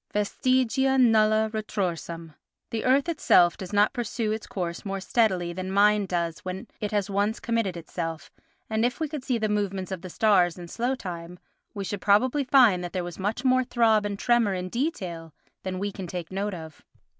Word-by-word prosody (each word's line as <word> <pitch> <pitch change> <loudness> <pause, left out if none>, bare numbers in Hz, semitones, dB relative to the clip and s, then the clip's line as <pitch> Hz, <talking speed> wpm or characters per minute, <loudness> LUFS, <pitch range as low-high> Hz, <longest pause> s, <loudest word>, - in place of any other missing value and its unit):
Vestigia 255 +5 +1
nulla 220 -3 +4
retrorsum; 170 -6 -3 0.4
the 225 - -2
earth 270 +4 +3
itself 180 - +4
does 185 -2 -8
not 205 +3 +3
pursue 230 -3 -2
its 215 0 -4
course 175 -3 -4
more 195 -1 -3
steadily 185 -5 +1
than 185 +1 -5
mind 205 0 +4
does 170 -2 -2
when 185 0 -6
it 210 - -2
has 205 -2 0
once 205 +2 0
committed 230 -6 -1
itself, 165 -1 -5 0.4
and 220 0 0
if 245 +2 0
we 315 - -1
could 295 -3 -6
see 255 -2 0
the 215 -1 0
movements 200 -2 -2
of 185 -3 -4
the 185 - -8
stars 185 -3 +3
in 175 -1 -8
slow 245 +8 -1
time 175 -5 -7 0.4
we 200 - -3
should 195 0 -4
probably 255 +8 +3
find 245 -9 +5
that 175 - -6
there 185 -2 -1
was 175 +1 -7
much 215 +7 -2
more 255 0 +4
throb 230 -4 +3
and 205 -1 -3
tremor 235 -3 +2
in 180 0 -4
detail 180 - -3 0.3
than 185 -1 -4
we 200 +2 -2
can 190 -2 -7
take 175 -1 -6
note 200 +1 -2
of. 160 -2 -10
205 Hz, 190 wpm, -26 LUFS, 180-230 Hz, 0.4 s, find